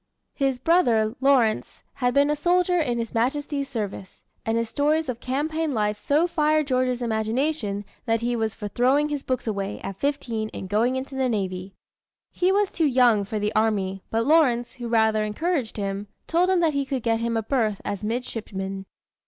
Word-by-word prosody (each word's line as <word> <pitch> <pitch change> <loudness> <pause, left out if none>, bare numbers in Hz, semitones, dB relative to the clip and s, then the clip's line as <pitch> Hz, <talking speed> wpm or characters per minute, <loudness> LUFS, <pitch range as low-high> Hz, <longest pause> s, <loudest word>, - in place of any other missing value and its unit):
His 270 -3 0
brother, 240 -8 +3
Lawrence, 255 -6 +2
had 245 0 0
been 285 +1 +4
a - - +1
soldier 355 +3 +2
in 245 -7 0
His 230 -1 -4
Majesty's 280 +4 -1
service, 200 -5 -5 0.2
and 225 +1 0
his 230 0 0
stories 300 +5 +1
of 245 -2 -3
campaign 300 +3 -1
life 210 -1 +1
so 290 +10 +2
fired 310 -3 +2
George's 255 -2 0
imagination 220 -1 -1 0.2
that 225 0 +1
he 240 +1 0
was 220 -2 -1
for 210 - -5
throwing 265 +8 +2
his 290 -2 -2
books 255 -2 -2
away, 200 -2 -3
at 195 -1 -6
fifteen, 240 -6 -2
and 190 - -5
going 225 +6 +1
into 265 +1 -5
the 265 -1 0
navy. 190 -3 -3 0.6
He 365 +1 +1
was 405 0 +2
too 325 -3 +1
young 245 -6 +4
for 215 +2 -4
the 210 +1 -1
army, 200 -3 0
but 225 +1 0
Lawrence, 265 -6 +3
who 240 -2 -6
rather 220 -2 +3
encouraged 260 +3 -2
him, 200 0 -3 0.2
told 350 +2 +2
him 370 -2 +3
that 325 -3 +2
he 280 0 0
could 265 -3 -3
get 225 -1 +1
him 230 0 -1
a 225 - -1
berth 220 -4 0
as 205 +1 -3
midshipman. 195 -4 -4
240 Hz, 185 wpm, -24 LUFS, 215-285 Hz, 0.6 s, been